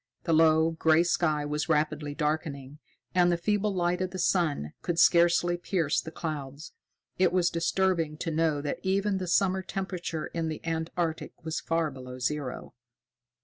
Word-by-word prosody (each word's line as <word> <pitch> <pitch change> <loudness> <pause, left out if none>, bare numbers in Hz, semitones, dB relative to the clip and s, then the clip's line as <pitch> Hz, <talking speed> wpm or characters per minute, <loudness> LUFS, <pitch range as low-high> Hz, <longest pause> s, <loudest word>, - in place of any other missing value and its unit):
The 165 - 0
low, 160 0 +5
gray 160 0 +3
sky 155 -4 +1
was 150 +2 -2
rapidly 150 -1 0
darkening, 150 -2 -3 0.3
and 175 -1 +4
the 175 - +1
feeble 205 +3 0
light 180 -1 0
of 185 - -1
the 185 - -7
sun 165 - 0
could 170 -2 -2
scarcely 175 0 +4
pierce 175 -4 0
the - - -8
clouds. 150 -2 -6 0.5
It 185 -2 +4
was 175 -1 +2
disturbing 170 -2 0
to 165 - -3
know 155 -2 +1
that 145 -1 -3
even 195 +1 0
the 185 - -4
summer 190 +2 +2
temperature 180 -4 -4
in 165 -1 -3
the 155 -1 -4
Antarctic 165 0 -2
was 160 0 -2
far 165 -2 -1
below 125 -1 -9
zero. 130 0 -3
165 Hz, 160 wpm, -28 LUFS, 150-175 Hz, 0.5 s, low